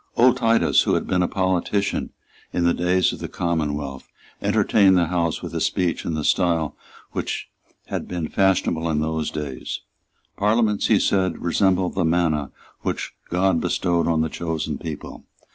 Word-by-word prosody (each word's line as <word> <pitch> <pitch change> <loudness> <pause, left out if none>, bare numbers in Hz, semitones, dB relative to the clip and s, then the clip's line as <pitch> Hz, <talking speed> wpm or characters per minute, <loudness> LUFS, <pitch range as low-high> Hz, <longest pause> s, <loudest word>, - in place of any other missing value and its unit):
Old 125 +1 +5
Titus, 115 -2 +3
who - - +1
had - - -1
been 90 -1 +1
a 90 - +2
politician 95 +2 0 0.4
in 90 - 0
the 85 0 +4
days 90 +1 +2
of - - -8
the - - -4
Commonwealth, 75 -5 -2 0.3
entertained 95 -3 +4
the 85 - +3
House 85 -1 -1
with - - -6
a - - -2
speech 90 -3 0
in 80 - -1
the 75 - -2
style 85 -3 +1 0.4
which - - -3 0.4
had - - -4
been 85 -3 -3
fashionable 85 -4 +1
in 75 -2 +1
those 80 0 -1
days. 70 -4 -5 0.6
Parliaments, 105 0 +2
he - - +5
said, 95 -2 +1
resembled 90 +1 +2
the 90 - 0
manna 80 -4 +1 0.3
which - - -3 0.2
God 90 -1 +2
bestowed 85 -1 +1
on 80 -2 +2
the 80 - 0
chosen 80 -1 -3
people. 80 -3 -7
85 Hz, 160 wpm, -23 LUFS, 80-95 Hz, 0.6 s, Old